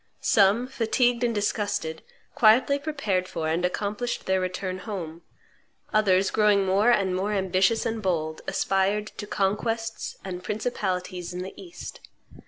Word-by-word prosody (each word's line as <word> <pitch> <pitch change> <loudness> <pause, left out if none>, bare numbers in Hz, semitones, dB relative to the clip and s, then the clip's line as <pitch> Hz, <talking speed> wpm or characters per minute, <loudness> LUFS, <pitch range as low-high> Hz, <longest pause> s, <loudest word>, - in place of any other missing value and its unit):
Some, 205 +4 +4
fatigued 245 -1 +1
and 235 -2 +1
disgusted, 205 -6 -1 0.3
quietly 245 +6 +5
prepared 250 -12 -1
for 160 -3 -3
and 165 +3 0
accomplished 205 +6 -2
their 190 0 +2
return 185 0 -3
home; 175 -6 -6 0.7
others, 195 -3 +3
growing 210 -2 +3
more 195 +5 +3
and 195 -6 +2
more 200 +3 -1
ambitious 190 +3 +2
and 225 -1 -2
bold, 160 -5 -1
aspired 195 +2 +1
to 205 - -5
conquests 225 +3 -2
and 180 -1 -5
principalities 185 -5 -3
in 180 - -3
the 190 - -7
East. 355 -2 -9
200 Hz, 135 wpm, -26 LUFS, 185-225 Hz, 0.7 s, quietly